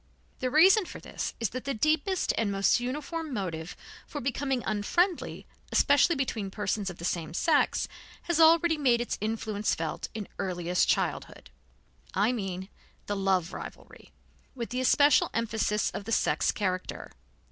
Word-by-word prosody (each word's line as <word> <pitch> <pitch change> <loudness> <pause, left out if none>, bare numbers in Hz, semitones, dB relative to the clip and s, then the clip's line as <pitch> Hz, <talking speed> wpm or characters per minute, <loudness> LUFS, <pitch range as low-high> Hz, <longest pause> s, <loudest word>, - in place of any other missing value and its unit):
The 255 - -1
reason 370 - +6
for - - -9
this - - -5
is 230 -4 0
that 255 +1 -6
the 275 -1 -2
deepest 315 - +1
and 215 -3 0
most 195 +3 +3
uniform 300 +5 -4
motive 175 -8 -4 0.3
for 295 - -5
becoming 270 -1 -1
unfriendly, 335 - 0 0.3
especially 285 +4 +4
between 230 -7 -2
persons 205 0 -2
of 175 - -9
the 170 - -6
same 170 -2 -2
sex, 310 - +2 0.4
has 345 -2 0
already 325 0 +5
made 250 -5 +3
its 240 - -3
influence 215 -1 -1
felt 160 -1 -4
in 215 -3 -5
earliest 180 -2 0
childhood. - - -2 0.6
I 205 +5 +3
mean 190 -5 -4 0.4
the 205 - -2
love 190 -3 0
rivalry, - - -10 0.4
with 235 -3 -5
the 250 +1 -1
especial 285 +3 +4
emphasis 220 -2 0
of 200 - -6
the 225 - -5
sex - - +2
character. 185 -3 -3
230 Hz, 150 wpm, -28 LUFS, 195-285 Hz, 0.6 s, reason